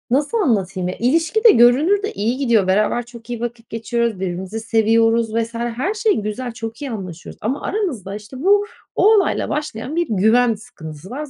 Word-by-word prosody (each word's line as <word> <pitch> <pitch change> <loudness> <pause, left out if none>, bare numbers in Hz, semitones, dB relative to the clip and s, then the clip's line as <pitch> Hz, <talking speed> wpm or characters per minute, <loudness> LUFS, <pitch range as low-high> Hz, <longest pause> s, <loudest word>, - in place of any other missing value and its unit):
nasıl 290 - +1
anlatayım, 195 - 0
ya, 180 - -3
ilişki 325 - +1
de 460 - +10
görünürde 315 - +4
iyi 225 +5 -1
gidiyor. 235 -8 +2
Beraber 215 +5 +1
çok 235 -1 -13
iyi 240 -2 -4
vakit 235 -1 -6
geçiriyoruz, 230 -2 -2
birbirimizi 190 +3 -4
seviyoruz 225 0 +2
vs. 230 0 -1
her 240 - -2
şey 435 -1 +1
güzel, 215 +4 -4
çok 225 +1 -7
iyi 280 - -4
anlaşıyoruz 185 -6 -8
ama 255 +7 -2
aramızda, 265 - -3
işte, 210 +5 -11
bu, 405 +3 +4 0.3
o 435 +3 +5
olayla 400 -3 +1
başlayan 295 -2 -4
bir 345 -1 +1
güven 225 +4 +3
sıkıntısı 180 -7 -11
var. 295 +5 -5
235 Hz, 175 wpm, -20 LUFS, 215-285 Hz, 0.3 s, de